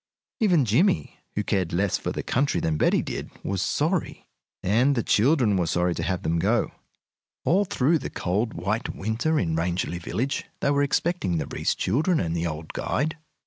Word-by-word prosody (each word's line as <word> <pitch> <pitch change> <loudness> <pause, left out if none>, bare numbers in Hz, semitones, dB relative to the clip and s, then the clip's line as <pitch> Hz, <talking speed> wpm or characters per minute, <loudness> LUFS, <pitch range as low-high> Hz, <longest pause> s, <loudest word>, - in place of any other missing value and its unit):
Even 180 - +4
Jimmie, 170 - +2 0.2
who 105 - 0
cared 95 -4 0
less 95 +3 +1
for - - -3
the - - -4
country 140 +3 +1
than 80 - 0
Betty - - +2
did, - - -5
was 100 -2 -1
sorry. 160 - -1 0.4
And 125 +9 +3
the 115 - 0
children 120 -3 +3
were 90 -2 +1
sorry 90 +1 +1
to 85 - -4
have 90 +3 -2
them 85 +1 +1
go. 105 +6 +1 0.7
All 195 +4 +3
through 155 -1 +2
the - - -5
cold, 105 +6 -1
white 105 +8 -2
winter 115 +10 0
in 80 -3 0
Rangeley 85 +1 -1
Village 130 +10 -2
they 140 - +1
were 140 0 +2
expecting 145 - 0
the - - -1
Reece - - -1
children 155 - +1
and 85 -1 -1
the 85 0 0
old 80 0 -6
guide. 160 +2 -1
110 Hz, 185 wpm, -25 LUFS, 90-145 Hz, 0.7 s, Even